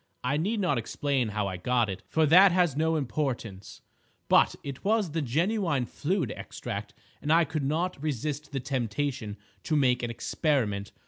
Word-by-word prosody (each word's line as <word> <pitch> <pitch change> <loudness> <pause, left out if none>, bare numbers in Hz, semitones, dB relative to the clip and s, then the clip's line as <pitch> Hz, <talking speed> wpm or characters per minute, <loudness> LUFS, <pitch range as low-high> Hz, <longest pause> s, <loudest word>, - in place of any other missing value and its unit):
I 125 +3 +1
need 205 +8 0
not 170 -10 +1
explain 135 +2 -1
how 105 -1 -2
I 95 -2 -3
got 120 +4 +1
it, 95 -1 -5
for 160 0 +2
that 180 +6 +7
has 175 -5 +2
no 160 +2 +1
importance; 120 -8 -3 0.5
but - - +5
it 140 -2 -7
was 210 -4 +1
the 160 +1 -1
genuine 160 - 0
fluid 155 - -2
extract, - - -6 0.3
and 150 - -1
I 165 +1 +5
could 155 -1 -3
not 160 +3 -1
resist 150 0 -3
the 135 - -2
temptation 125 -3 -2 0.2
to 155 - -1
make 125 -4 +3
an 120 - -2
experiment. 115 -5 -1
145 Hz, 170 wpm, -28 LUFS, 120-160 Hz, 0.5 s, that